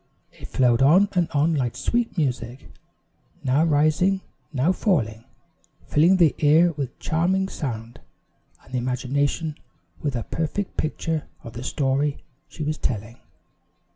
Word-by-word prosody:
It - - -11
flowed 125 -1 +2
on 180 +9 +5
and 175 -3 +1
on 155 +1 +2
like 125 -5 -1
sweet 235 - -1
music, 125 -4 -2 0.8
now 135 +4 +3
rising, 160 +5 +2 0.3
now 145 +4 +2
falling, 115 - 0 0.6
filling 170 +6 +4
the 165 -5 +5
ear 160 +4 +5
with 140 -5 -5
charming 185 +4 0
sound, 115 - -5 0.6
and 130 - -18
the 125 - +1
imagination 140 +5 -1 0.4
with 145 -4 -2
a 120 - -2
perfect 165 +5 -3
picture 155 0 -2 0.2
of 115 - -9
the 120 - -7
story 140 +2 0 0.3
she 155 - -7
was 155 +1 -2
telling. 115 0 -3
145 Hz, 135 wpm, -24 LUFS, 125-165 Hz, 0.8 s, on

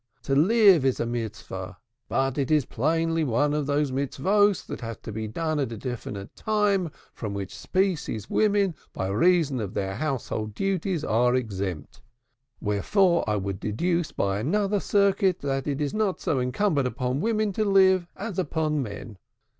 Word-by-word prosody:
To 135 - -1
live 195 - +6
is 130 -2 +1
a - - 0
Mitzvah, 115 -2 -5 0.3
but 135 0 0
it 135 - 0
is 150 -4 +3
plainly 165 +5 0
one 145 +2 +1
of 150 -2 -1
those 145 -1 +1
Mitzvahs 190 +9 +2
that - - -7
have 115 -2 -6
to - - -6
be 110 +1 -4
done 155 +7 -2
at 135 -4 -1
a 115 - -5
definite 105 -5 -6
time, 205 -5 +1 0.2
from 105 -3 -5
which 100 -2 -5
species 175 - -1
women, 205 -3 +2 0.2
by 95 - -2
reason 145 - +3
of 105 -1 -5
their 95 0 -2
household 115 -7 -3
duties, 190 - -1
are 125 +1 +2
exempt; 100 - -4 0.6
wherefore 170 - +2
I 105 - +2
would 100 -1 -3
deduce 170 - -1
by 100 0 -1
another 200 - +1
circuit 200 -2 +2
that 135 -1 -2
it 140 -1 -1
is 145 -2 -1
not 215 -3 0
so 140 - 0
incumbent 135 +3 +1
upon 125 +1 -2
women 215 -1 0
to 215 - 0
live 190 -3 +4
as 200 -2 -4
upon 155 -3 0
men. 105 -3 -7
145 Hz, 165 wpm, -26 LUFS, 115-190 Hz, 0.6 s, live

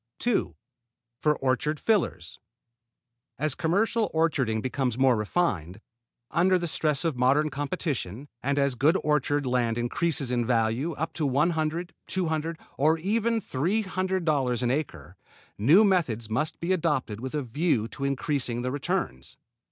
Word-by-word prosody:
2. 240 -2 0 0.6
For 150 -1 +2
orchard 135 +3 0
fillers. 155 - 0 1.0
As 155 -1 +1
commercial 205 +7 +1
orcharding 140 -9 +1
becomes 130 0 -1
more 130 -1 +4
refined, 105 - -1 0.5
under 185 +2 +3
the 175 - -3
stress 155 -1 -1
of 150 -7 -1
modern 145 +4 +3
competition, 140 - -3
and 140 +2 0
as 140 -1 +3
good 145 +9 +3
orchard 145 -1 +1
land 120 -2 +1
increases 135 +3 0
in 120 -1 +1
value, 120 +6 0
up 160 +3 -4
to 150 0 -1
one 145 +6 +2
hundred, 160 +2 -2
two 185 -2 -1
hundred, 160 +1 -2 0.2
or 155 +3 +4
even 225 +6 0
three 185 +6 -1
hundred 185 -2 -2
dollars 130 -6 +1
an 120 - +2
acre, 90 - -4 0.4
new 155 - +6
methods 130 - +1
must 150 +8 -1
be 175 +3 0
adopted 145 - -1
with 130 +4 -5
a 150 - -1
view 125 -2 0
to 135 - -7
increasing 140 -3 -1
the 125 - -1
returns. 135 - -3
145 Hz, 150 wpm, -27 LUFS, 125-170 Hz, 1.0 s, new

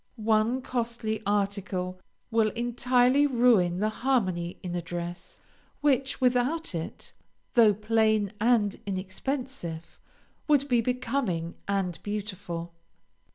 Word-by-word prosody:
One 225 +3 +1
costly 235 -3 -2
article 195 -3 -1 0.3
will 225 -1 +3
entirely 245 +3 +3
ruin 230 -9 +3
the 210 +3 +1
harmony 185 -10 0
in 180 -1 -4
a 175 - -1
dress, 175 +1 -6 0.4
which, 275 -2 +1
without 255 +4 +1
it, 165 -1 -6 0.4
though 220 -4 +6
plain 215 -1 +2
and 220 -3 +3
inexpensive, 190 - -4 0.5
would 285 -2 +3
be 245 -3 +3
becoming 235 -9 -1
and 195 -4 -1
beautiful. 190 -5 -5
215 Hz, 105 wpm, -28 LUFS, 185-250 Hz, 0.5 s, though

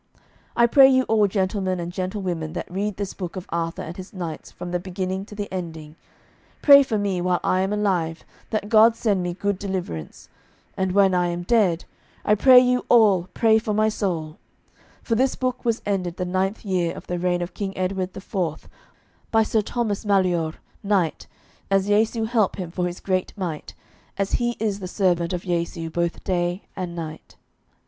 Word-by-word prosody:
I 235 - +6
pray 265 +3 +7
you 260 -1 +4
all 220 -3 +3
gentlemen 190 -1 -1
and 170 0 -4
gentlewomen 185 -4 -3
that 175 - -5
read 200 +2 -2
this 200 -1 -4
book 180 -2 -6
of 185 -1 -6
Arthur 165 0 -2
and 165 - -7
his 185 0 -9
knights 170 -5 -6
from 175 - -8
the 180 - 0
beginning 185 +1 -4
to 210 - -11
the 205 -1 -4
ending, 160 -4 -6 0.7
pray 280 -1 +9
for 245 -5 -1
me 200 -3 -1
while 180 0 +1
I 185 - +2
am 190 +1 -1
alive 185 -6 -1 0.2
that 215 -2 -2
God 225 +1 +6
send 205 -5 0
me 175 -1 -3
good 200 0 -1
deliverance, 180 - -5 0.5
and 190 -1 -1
when 195 -1 +4
I 180 -1 +2
am 175 0 -3
dead, 185 -5 +2 0.4
I 210 - +4
pray 255 +5 +7
you 250 0 +2
all 200 -7 +5
pray 220 -1 +4
for 215 -1 -2
my 215 +1 +3
soul; 170 -7 -3 0.6
for 230 - -1
this 255 +4 +2
book 255 -1 -2
was 230 -1 0
ended 185 -4 -2
the 180 - -2
ninth 190 +4 -1
year 180 -4 0
of - - -10
the 175 0 -3
reign 175 0 0
of 175 +1 -7
King 195 -2 -5
Edward 185 0 -2
the 190 - -8
Fourth 175 -5 -3 0.6
by 225 -1 +4
Sir 220 0 +1
Thomas 215 -1 -2
Maleore, 180 -6 +1 0.3
knight, 195 -5 0 0.4
as 195 -1 +2
Jesu 220 +2 +2
help 220 -3 +1
him 180 -4 -5
for 180 0 -1
his 175 0 -6
great 185 -1 -1
might, 170 -6 -5 0.4
as 195 -1 -1
he 240 0 0
is 205 -2 -1
the 185 - -5
servant 175 -3 +1
of 180 -1 -3
Jesu 170 -2 -2
both 170 +1 -2
day 175 0 -1
and 180 -2 -5
night. 160 -2 -8
190 Hz, 190 wpm, -23 LUFS, 175-210 Hz, 0.7 s, pray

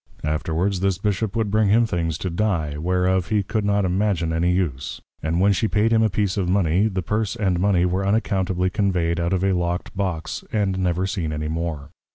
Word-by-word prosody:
Afterwards 80 +5 -1
this 95 -1 +1
Bishop 105 +2 -1
would 110 -3 0
bring 110 -1 +3
him 115 +3 +4
things 85 -6 -2
to 90 - -4
Dye, 85 -6 -1
whereof 90 +3 +1
he 105 -1 +1
could 105 +2 -2
not 100 -1 +1
imagin 90 -3 0
any 85 +2 +1
use; 85 -8 -2 0.2
and 80 +2 -1
when 100 +2 +4
she 110 +4 +1
paid 110 +2 +2
him 110 - +4
a 110 - +3
piece 100 0 -1
of 90 -3 0
Mony, 95 +1 +2
the 95 -4 -3
Purse 105 +3 -1
and 95 -4 0
Mony 90 -2 +3
were 90 +2 0
unaccountably 95 -3 0
conveyed 90 -5 0
out 85 +1 0
of 95 -1 0
a 95 0 +2
lock'd 90 +1 -2
Box, 95 -5 -3
and 100 -3 0
never 90 0 0
seen 90 -5 -2
any 75 0 -3
more. 80 -3 -4
95 Hz, 210 wpm, -22 LUFS, 85-100 Hz, 0.2 s, him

